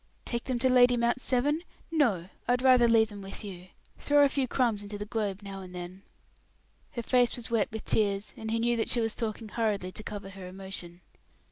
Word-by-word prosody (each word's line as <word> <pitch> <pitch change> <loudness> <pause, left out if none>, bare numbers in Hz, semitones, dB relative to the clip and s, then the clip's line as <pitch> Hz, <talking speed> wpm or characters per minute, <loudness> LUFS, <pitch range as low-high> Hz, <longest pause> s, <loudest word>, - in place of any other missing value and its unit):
"Take 235 -1 -3
them 255 -2 -1
to 260 +2 +2
Lady 250 -1 +6
Mount 235 +2 +1
Severn! 285 +6 +1 0.3
No, 220 - +2 0.2
I 245 - +4
would 250 +1 0
rather 255 -2 +6
leave 225 -1 +4
them 205 -1 -9
with 195 +3 -6
you. 185 -3 -8 0.3
Throw 290 0 +4
a - - +3
few 270 -1 0
crumbs 235 -5 +1
into 205 0 -6
the 205 - -5
globe 205 -2 -2
now 195 -1 -7
and 180 -1 -10
then." 180 +2 -7 0.9
Her 235 -3 -4
face 245 0 +3
was 235 -1 -8
wet 225 -3 +1
with 220 0 -6
tears, 205 -1 0
and 220 - -6
he 225 - +1
knew 235 +1 +2
that 225 - 0
she 240 - +3
was 225 -1 0
talking 220 -1 -4
hurriedly 205 -5 -1
to 215 - -6
cover 205 -2 -6
her 190 -1 -9
emotion. 185 -2 -7
220 Hz, 220 wpm, -29 LUFS, 195-245 Hz, 0.9 s, Lady